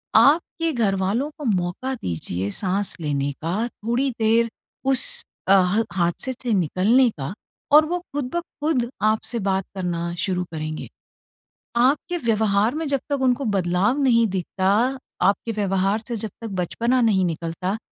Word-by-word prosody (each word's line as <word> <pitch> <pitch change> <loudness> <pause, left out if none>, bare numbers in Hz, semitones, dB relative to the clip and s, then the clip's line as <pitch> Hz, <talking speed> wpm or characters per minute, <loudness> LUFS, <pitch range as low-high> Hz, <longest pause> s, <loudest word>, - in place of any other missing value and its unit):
आपके 330 +2 +4
घरवालों 210 +3 0
को 300 - -7
मौका 195 +5 -1
दीजिए 90 - -3
साँस 195 - 0
लेने 145 -2 -1
का 185 +9 -1
थोड़ी 240 +4 -1
देर 230 +1 +3 0.4
उस 485 - +2 0.2
अ, - - +3
ह 195 +3 +4
हादसे 175 +8 0
से 245 -2 -2
निकलने 200 - +3
का 135 +6 -4 0.4
और 305 +1 +8
वो 350 +3 -1
खुद 285 -3 -2
ब - - +2 0.2
खुद 260 -7 +1
आपसे 220 +2 +1
बात 195 -2 0
करना 170 -2 -2
शुरू 180 -1 0
करेंगे। 155 0 -4 0.9
आपके 280 +8 +2
व्यवहार 220 -3 +1
में 320 +1 -2
जब 280 -1 +1
तक 285 -2 0
उनको 260 +1 +2
बदलाव 195 +4 +1
नहीं 235 -4 +4
दिखता, 195 +7 +1 0.2
आपके 200 +5 +2
व्यवहार 195 -1 +1
से 240 - -3
जब 220 0 -4
तक 230 - -4
बचपना 235 +8 0
नहीं 200 -5 +3
निकलता, 170 +4 -3
215 Hz, 145 wpm, -23 LUFS, 185-255 Hz, 0.9 s, और